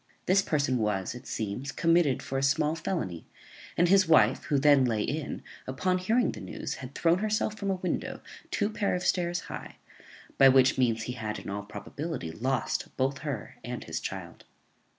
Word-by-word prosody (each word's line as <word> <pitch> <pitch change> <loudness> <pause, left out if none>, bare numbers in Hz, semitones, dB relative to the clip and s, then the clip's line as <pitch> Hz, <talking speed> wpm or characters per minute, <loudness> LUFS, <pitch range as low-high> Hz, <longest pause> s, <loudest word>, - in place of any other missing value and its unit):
This 190 +2 +4
person 140 -7 0
was, 105 -3 -1
it 125 - -10
seems, 110 +6 -3
committed 165 -5 +2
for 135 - -2
a - - -2
small 145 +3 +2
felony; 155 - -3 0.5
and 175 - +4
his 190 0 +5
wife, 130 -7 +4
who 145 -1 +1
then 140 -1 +5
lay 110 -4 +1
in, 155 0 -3 0.2
upon 185 +8 0
hearing 225 +7 +2
the - - -9
news, - - -5
had 130 +1 -9
thrown 170 +2 +3
herself 215 0 0
from 200 -1 -3
a 190 - +2
window 185 -1 -3 0.3
two 205 0 0
pair 205 -3 0
of 180 - -3
stairs 175 -1 +1
high, - - -8 0.6
by 135 - +9
which 130 0 +5
means 115 -3 +1
he 125 - -4
had, 110 -3 -4
in - - -7
all 100 +1 -3
probability, 125 - -6
lost 130 +9 -1
both 135 +1 0
her 140 -7 -5
and - - -5
his - - -4
child. - - -7
140 Hz, 185 wpm, -29 LUFS, 125-175 Hz, 0.6 s, by